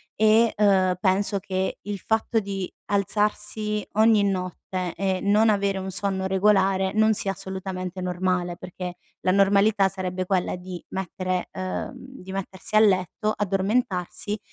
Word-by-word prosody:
e, 220 Hz, +1 st, +4 dB
uhm, 190 Hz, -3 st, +4 dB
penso 200 Hz, +1 st, +2 dB
che 190 Hz, 0 st, -2 dB
il 205 Hz, -1 st, -5 dB
fatto 220 Hz, +2 st, 0 dB
di 195 Hz, -3 st, -4 dB, 0.2 s
alzarsi 210 Hz, +1 st, -1 dB
ogni 220 Hz, -1 st, +5 dB
notte 185 Hz, -2 st, -3 dB
e 190 Hz, -1 st, 0 dB
non 210 Hz, +2 st, +4 dB
avere 200 Hz, -1 st, +1 dB
un 190 Hz, 0 st, -5 dB
sonno 190 Hz, 0 st, -2 dB
regolare 190 Hz, -1 st, +2 dB
non 220 Hz, 0 st, +4 dB
sia 205 Hz, -2 st, 0 dB
assolutamente 190 Hz, -1 st, -5 dB
normale, 180 Hz, -1 st, -1 dB
perché 180 Hz, 0 st, -7 dB, 0.3 s
la 185 Hz, -, +4 dB
normalità 200 Hz, +1 st, +4 dB
sarebbe 185 Hz, -1 st, -3 dB
quella 185 Hz, -1 st, 0 dB
di 180 Hz, 0 st, -8 dB
mettere 185 Hz, -1 st, -3 dB
uhm, 185 Hz, +7 st, -4 dB
di 255 Hz, -7 st, -11 dB
mettersi 195 Hz, +1 st, -5 dB
a -, -, +8 dB
letto, 205 Hz, +1 st, +2 dB
addormentarsi 200 Hz, 0 st, -1 dB
195 Hz, 135 wpm, -25 LUFS, 185-210 Hz, 0.3 s, a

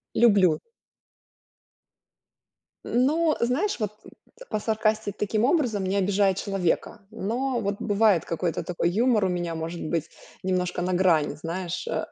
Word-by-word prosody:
Люблю. 200 Hz, -8 st, +5 dB, 2.2 s
Но, 305 Hz, +6 st, +2 dB
знаешь, 265 Hz, -, 0 dB
вот, 210 Hz, -2 st, -1 dB, 0.6 s
посаркастить 215 Hz, -1 st, -1 dB
таким 210 Hz, +2 st, +1 dB
образом, 250 Hz, -, +1 dB
не 190 Hz, +1 st, -1 dB
обижая 200 Hz, 0 st, +2 dB
человека. 195 Hz, +2 st, -2 dB
Но 240 Hz, +5 st, -2 dB
вот 200 Hz, -1 st, -1 dB
бывает 205 Hz, -5 st, +3 dB
какой-то 165 Hz, 0 st, -2 dB
такой 175 Hz, -1 st, -1 dB
юмор 220 Hz, +2 st, +2 dB
у -, -, +1 dB
меня, 175 Hz, -2 st, -2 dB
может 165 Hz, +1 st, -5 dB
быть, 165 Hz, 0 st, -2 dB, 0.3 s
немножко 180 Hz, -1 st, -1 dB
на 180 Hz, +1 st, -1 dB
грани, 170 Hz, -5 st, +2 dB
знаешь, 170 Hz, +3 st, -4 dB
э. 160 Hz, 0 st, -2 dB
200 Hz, 125 wpm, -26 LUFS, 175-225 Hz, 2.2 s, Люблю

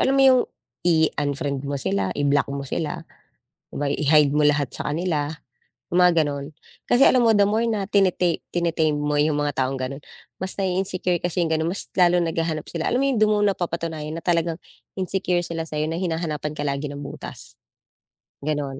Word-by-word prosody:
alam 270 Hz, +1 st, +3 dB
mo 270 Hz, -, +5 dB
yung 255 Hz, -1 st, +7 dB, 0.5 s
i-unfriend 145 Hz, -4 st, +1 dB
mo 140 Hz, -, -1 dB
sila, 100 Hz, -5 st, 0 dB
i-block 145 Hz, -1 st, +2 dB
mo 140 Hz, 0 st, -4 dB
sila 150 Hz, +2 st, -3 dB, 0.7 s
'di -, -, -14 dB
ba, 145 Hz, -, -1 dB
i-hide 150 Hz, -1 st, +4 dB
mo 150 Hz, -, +2 dB
lahat 145 Hz, -3 st, +1 dB
sa -, -, -4 dB
kanila, 150 Hz, -2 st, -1 dB, 0.6 s
mga 175 Hz, -2 st, +5 dB
gano'n. 140 Hz, 0 st, -4 dB, 0.4 s
Kasi 245 Hz, +3 st, +6 dB
alam 250 Hz, -2 st, +4 dB
mo, 230 Hz, -, +5 dB
the 205 Hz, -2 st, +4 dB
more 220 Hz, +3 st, +1 dB
na 210 Hz, -4 st, -1 dB
tine 195 Hz, -3 st, +3 dB, 0.4 s
tine-tame 165 Hz, -3 st, +1 dB
mo 150 Hz, 0 st, -1 dB
yung 150 Hz, 0 st, +1 dB
mga 145 Hz, -1 st, -1 dB
taong 135 Hz, +1 st, -2 dB
gano'n, 135 Hz, +2 st, -5 dB, 0.4 s
mas 190 Hz, 0 st, -4 dB
nai-insecure 185 Hz, -2 st, 0 dB
kasi 175 Hz, 0 st, -1 dB
yung 160 Hz, -, -2 dB
gano'n, 160 Hz, +1 st, 0 dB
mas 195 Hz, -, -4 dB
lalong 175 Hz, -2 st, +4 dB
naghahanap 165 Hz, -2 st, -2 dB
sila. 165 Hz, -1 st, -2 dB
Alam 250 Hz, -, +2 dB
mo 275 Hz, -, +2 dB
yung, 270 Hz, -, +1 dB
hindi 215 Hz, -1 st, +4 dB
mo 210 Hz, -, +3 dB
napapatunayan 165 Hz, -5 st, -2 dB
na -, -, -17 dB
talagang 170 Hz, -1 st, +1 dB, 0.4 s
insecure 185 Hz, -1 st, 0 dB
sila 170 Hz, -1 st, -3 dB
sa'yo, 155 Hz, -1 st, -2 dB
na 165 Hz, -, -2 dB
hinahanapan 165 Hz, -4 st, -2 dB
ka 150 Hz, -1 st, -4 dB
lagi 140 Hz, +1 st, -2 dB
ng 145 Hz, -, -7 dB
butas, 140 Hz, -, -9 dB, 0.9 s
gano'n, 140 Hz, -2 st, -3 dB
160 Hz, 185 wpm, -23 LUFS, 145-180 Hz, 0.9 s, yung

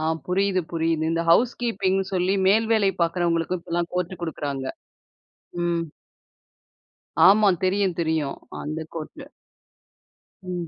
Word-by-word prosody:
ஆ -, -, -3 dB, 0.2 s
புரியுது, 190 Hz, +1 st, +1 dB
புரியுது. 165 Hz, -1 st, 0 dB
இந்த 165 Hz, 0 st, 0 dB
ஹவுஸ் 235 Hz, +8 st, +5 dB
கீப்பிங்ன்னு 195 Hz, -4 st, 0 dB
சொல்லி 185 Hz, +2 st, +1 dB
மேல் 220 Hz, +3 st, +4 dB
வேலை 205 Hz, -3 st, +3 dB
பாக்கறவங்களுக்கும் 170 Hz, 0 st, 0 dB
இப்பெல்லாம் 170 Hz, 0 st, -3 dB
கோர்ட் 180 Hz, 0 st, -3 dB
கொடுக்குறாங்க. 145 Hz, -5 st, -4 dB, 1.0 s
ம். 170 Hz, -1 st, 0 dB, 1.4 s
ஆமா 205 Hz, +1 st, +6 dB
தெரியும், 190 Hz, -1 st, +1 dB
தெரியும். 160 Hz, -4 st, -1 dB, 0.2 s
அந்த 155 Hz, +2 st, -4 dB, 0.2 s
கோர்ட். 165 Hz, -, -7 dB, 1.2 s
ம். 180 Hz, -2 st, -4 dB
175 Hz, 110 wpm, -24 LUFS, 165-195 Hz, 1.4 s, ஆமா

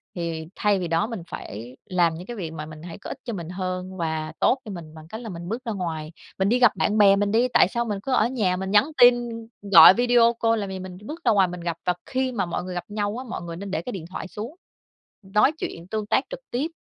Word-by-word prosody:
thì 165 Hz, -2 st, -3 dB
thay 205 Hz, -2 st, +2 dB
vì 175 Hz, -, -2 dB
đó 165 Hz, +5 st, +1 dB
mình 225 Hz, -7 st, -5 dB
phải 120 Hz, +5 st, -8 dB
làm 175 Hz, -3 st, +2 dB
những 175 Hz, -, -8 dB
cái 240 Hz, -, -6 dB
việc 165 Hz, -4 st, -4 dB
mà 155 Hz, -1 st, -6 dB
mình 155 Hz, 0 st, -11 dB
thấy 170 Hz, 0 st, -8 dB
có -, -, -9 dB
ích -, -, -5 dB
cho 235 Hz, -, -4 dB
mình 170 Hz, -3 st, -6 dB
hơn 185 Hz, 0 st, -4 dB
và 160 Hz, -2 st, -2 dB
tốt 265 Hz, -, +4 dB
cho 210 Hz, -, -6 dB
mình 160 Hz, -4 st, -8 dB
bằng 155 Hz, 0 st, -12 dB
cách 220 Hz, +6 st, -7 dB
là 225 Hz, -, -7 dB
mình 175 Hz, 0 st, -7 dB
bước 235 Hz, +3 st, -3 dB
ra 225 Hz, -, -2 dB
ngoài. 165 Hz, -5 st, -4 dB, 0.3 s
Mình 190 Hz, +1 st, +2 dB
đi 245 Hz, +2 st, +3 dB
gặp 245 Hz, -4 st, +6 dB
bạn 210 Hz, -, +1 dB
bè 200 Hz, -1 st, +7 dB
mình 205 Hz, 0 st, 0 dB
đi, 235 Hz, +3 st, +3 dB
tại -, -, +6 dB
sao 235 Hz, +4 st, -2 dB
mình 205 Hz, -3 st, -3 dB
cứ 270 Hz, -, -3 dB
ở 235 Hz, -3 st, +4 dB
nhà 205 Hz, -8 st, 0 dB
mình 190 Hz, +1 st, -4 dB
nhắn 205 Hz, +2 st, +6 dB, 0.2 s
tin 245 Hz, 0 st, +10 dB, 0.6 s
gọi 180 Hz, +1 st, +11 dB
video 240 Hz, 0 st, +4 dB
call 230 Hz, 0 st, +1 dB
làm 200 Hz, -1 st, -3 dB
gì, 190 Hz, 0 st, -5 dB
mình 185 Hz, -1 st, -8 dB
bước 325 Hz, +5 st, -7 dB
ra -, -, +5 dB
ngoài 195 Hz, -3 st, +4 dB
mình 175 Hz, 0 st, -7 dB
gặp, 170 Hz, -1 st, -3 dB
và 180 Hz, -, +3 dB
khi 260 Hz, 0 st, -1 dB
mà 200 Hz, -6 st, -1 dB
mọi 175 Hz, -, -3 dB
người 185 Hz, 0 st, -6 dB
gặp 175 Hz, -, -3 dB
nhau 205 Hz, +1 st, -2 dB
á, 255 Hz, -, -5 dB
mọi -, -, -4 dB
người 170 Hz, -1 st, -6 dB
nên 195 Hz, +2 st, -7 dB
để -, -, -1 dB
cái 250 Hz, -, -6 dB
điện 170 Hz, -4 st, -6 dB
thoại 190 Hz, -, -6 dB
xuống 225 Hz, -, -7 dB, 0.7 s
nói 210 Hz, +8 st, +3 dB
chuyện 170 Hz, -, -6 dB
tương 215 Hz, 0 st, -3 dB
tác 265 Hz, +6 st, +2 dB
trực -, -, -6 dB
tiếp 260 Hz, +6 st, 0 dB
190 Hz, 280 wpm, -24 LUFS, 170-225 Hz, 0.7 s, gọi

